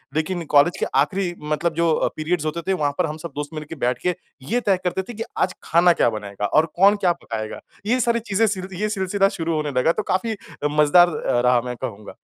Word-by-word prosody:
लेकिन 170 +2 -1
कॉलेज 145 +4 +5
के - - +1
आखिरी 175 +5 0 0.2
मतलब 160 +2 0
जो 170 0 +2
अ, - - +1
पीरियड्स 155 0 -1
होते 160 +2 -2
थे 190 - +2
वहाँ 145 -5 0
पर 180 - +2
हम 155 0 -5
सब 165 -1 -8
दोस्त 145 0 -4
मिल 155 -1 -5
के - - -6
बैठ 125 0 +1
के 180 - +2 0.4
ये 245 - +3
तय 195 -4 +2
करते 180 +1 -1
थे - - -5
कि 225 +1 -4
आज 185 - +1
खाना 170 +1 +4
क्या - - +2
बनाएगा 105 -2 -5
और 155 +9 +3
कौन 200 +3 +6
क्या 175 - +5
पकाएगा। 110 -1 -5 0.3
ये 245 +4 +2
सारी 235 -1 +2
चीज़ें 220 +3 +3
सिल 190 -3 -3
ये 215 - +1
सिलसिला 195 -1 +1
शुरू 165 0 -1
होने 150 -1 -1
लगा 160 - +3
तो 215 - -2
काफ़ी 220 +5 0
अ, 175 -7 -6
मजेदार 150 +4 +5 0.4
रहा 125 -1 +4
मैं 125 0 -4
कहूँगा। 110 -5 -7
170 Hz, 235 wpm, -22 LUFS, 145-190 Hz, 0.4 s, कौन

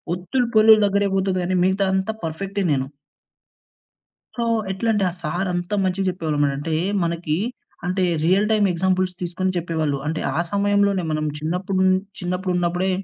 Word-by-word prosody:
ఒత్తులు, 190 +8 -1
పొల్లులు 215 0 +7
దగ్గరే 200 0 +2
పోతది 190 -1 0
గానీ, 185 +1 0
మిగతాదంతా 190 +2 +1
పర్ఫెక్టే 195 +5 -3
నేను. 135 -1 -1 1.5
సో, 235 - 0 0.3
ఎట్లంటే, 210 +1 0
ఆ - - -7
సార్ 175 +5 -1
అంత 175 +3 -3
మంచిగా 190 +1 0
జెప్పేవాళ్ళు 160 -4 -2
అనమాట. 145 -1 +2
అంటే, 155 +1 -2 0.3
మనకి 165 -2 -1 0.5
అంటే 185 +1 0 0.2
రియల్ 190 +5 +3
టైమ్ 210 -2 +3
ఎగ్జాంపుల్స్ 185 +1 0
తీసుకొని 185 +2 -1
చెప్పేవాళ్ళు. 160 -4 -1
అంటే, 160 +1 -2 0.2
ఆ - - +1
సమయంలోనే 200 -2 +2
మనం 155 0 -1
చిన్నప్పుడు 180 +4 -1 0.4
చిన్నప్పుడు 180 +1 -2
ఉన్నప్పుడే 175 +2 0
185 Hz, 145 wpm, -22 LUFS, 170-195 Hz, 1.5 s, పొల్లులు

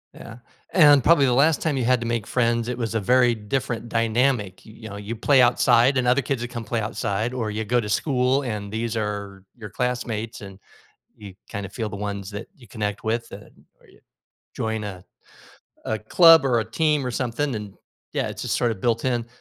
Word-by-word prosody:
Yeah, 115 0 -11 0.4
and 145 -6 +6
probably 150 -4 +5
the 125 - +2
last 150 +5 +3
time 155 -4 0
you 125 - -1
had 125 0 +2
to 115 - -3
make 115 -3 -2
friends, 115 -1 0
it 125 -1 -3
was 115 -2 -3
a - - +2
very 120 +3 +3
different 115 +1 -3
dynamic, 115 -3 0
you 110 - -14
you 110 0 -10
know, 100 - -8
you 105 +3 -6
play 135 +4 +3
outside 125 +1 +4
and 125 - 0
other 125 +3 +3
kids 130 -1 -2
would 120 - -4
come 120 -2 -6
play 115 0 -2
outside, 110 +1 -2
or 115 -4 -3
you 110 +1 -3
go 120 +3 +1
to 105 -3 -4
school 130 +3 +1
and 105 -5 -5
these 115 +1 -2
are 100 -2 -4
your 110 -4 -9
classmates, 115 -1 -3
and 100 -2 -10 0.6
you 100 -3 -11 0.2
kinda 100 -3 -5
feel 110 +2 -4
the 100 - -7
ones 100 -1 -5
that 100 +1 -7
you 125 -7 -18
connect 105 +2 -4
with 115 +1 -1
that - - -12 0.3
or - - -24
you - - -22 0.6
join 110 -1 -3
a 95 -3 -8 0.8
a 110 - -2
club 165 - +6
or 125 -3 +2
a - - -3
team 150 0 +1
or - - -2
something, 125 +3 -2
and 105 -3 -7 0.4
Yeah, - - -1
it's - - -7
just - - -1
sorta 120 -2 0
built-in, 120 +3 -1
115 Hz, 210 wpm, -23 LUFS, 105-125 Hz, 0.8 s, and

